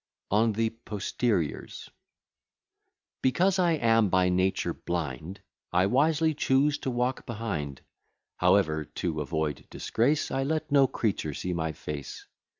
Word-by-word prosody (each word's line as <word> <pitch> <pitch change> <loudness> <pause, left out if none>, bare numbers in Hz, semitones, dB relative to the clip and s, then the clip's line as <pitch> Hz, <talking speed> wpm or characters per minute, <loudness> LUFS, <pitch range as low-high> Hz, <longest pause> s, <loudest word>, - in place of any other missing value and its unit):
ON 110 +2 +3
THE 110 +1 0
POSTERIORS 105 -5 -3 1.3
Because 180 +9 +2
I 175 -2 +3
am 115 -7 +3
by 90 0 +3
nature 95 +1 +1
blind, 85 +2 -4 0.3
I 90 +2 +3
wisely 155 +7 +3
choose 145 +1 +2
to - - -3
walk 125 +1 -1
behind; 100 - -4 0.6
However, 80 0 +3
to 80 +1 -3
avoid 80 -3 -2
disgrace, 140 +7 0
I 135 - 0
let 155 +2 -1
no 140 -2 +6
creature 95 - -2
see 90 - -3
my 80 -2 -1
face. 75 -2 -7
110 Hz, 125 wpm, -28 LUFS, 85-135 Hz, 1.3 s, no